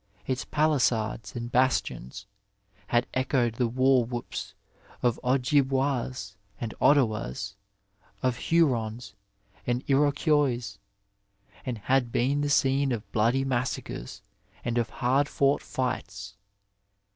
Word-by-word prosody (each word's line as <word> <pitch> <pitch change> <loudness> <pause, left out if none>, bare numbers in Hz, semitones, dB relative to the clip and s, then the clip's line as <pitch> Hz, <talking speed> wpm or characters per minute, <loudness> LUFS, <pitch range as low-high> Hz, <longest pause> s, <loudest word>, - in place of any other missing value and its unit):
Its 130 -1 -1
paUsades 125 -8 0
and 120 0 -5
bastions 110 - 0 0.6
had 120 +1 +2
echoed 130 -3 +1
the 120 +1 0
war 130 +1 +3
whoops 120 0 -6 0.5
of 120 -2 +2
Ojibwas 130 -4 +1 0.2
and 115 -2 -4
Ottawas, 110 - +2 0.7
of 130 -1 +1
Hurons 120 -10 +1 0.5
and 125 +1 0
Iroquois, 140 -6 +2 0.8
and 125 -3 -3
had 125 +2 +1
been 140 +5 +1
the 145 - 0
scene 135 0 +3
of 110 -4 -4
bloody 120 +5 +2
massacres 120 - -3 0.4
and 120 0 +1
of 115 - -1
hard 135 +4 +1
fought 140 +1 +2
fights. 100 -6 -4
125 Hz, 105 wpm, -27 LUFS, 115-135 Hz, 0.8 s, war